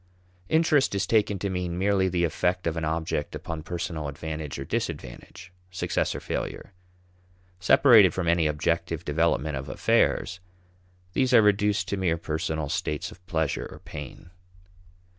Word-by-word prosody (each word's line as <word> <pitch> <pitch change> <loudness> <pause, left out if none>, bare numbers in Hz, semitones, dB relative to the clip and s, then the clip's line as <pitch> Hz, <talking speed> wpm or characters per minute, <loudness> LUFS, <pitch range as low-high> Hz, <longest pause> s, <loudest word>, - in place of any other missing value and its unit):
Interest 155 -7 +3
is 100 - 0
taken 105 -3 +2
to 100 - -3
mean 90 -2 -3
merely 95 0 +2
the 90 -1 0
effect 90 +2 0
of 85 -1 0
an 80 - -3
object 80 -1 -2
upon 80 -1 -5
personal 85 -2 -4
advantage 75 0 -5
or 70 - -5
disadvantage, 65 +9 -5 0.2
success 90 - -1
or - - -3
failure. 105 - -5 0.9
Separated 105 +1 +6
from 85 +1 -3
any 85 -1 +3
objective 85 +2 -1
development 75 -2 +1
of 65 +1 -6
affairs, 90 - +1 0.7
these 130 -2 +3
are 115 - +7
reduced 105 -1 +2
to 100 - -1
mere 90 -3 +1
personal 80 -1 -3
states 75 +6 -2
of 90 -3 -16
pleasure 80 -4 -1
or - - -10
pain. 75 +4 -10
85 Hz, 145 wpm, -26 LUFS, 80-95 Hz, 0.9 s, are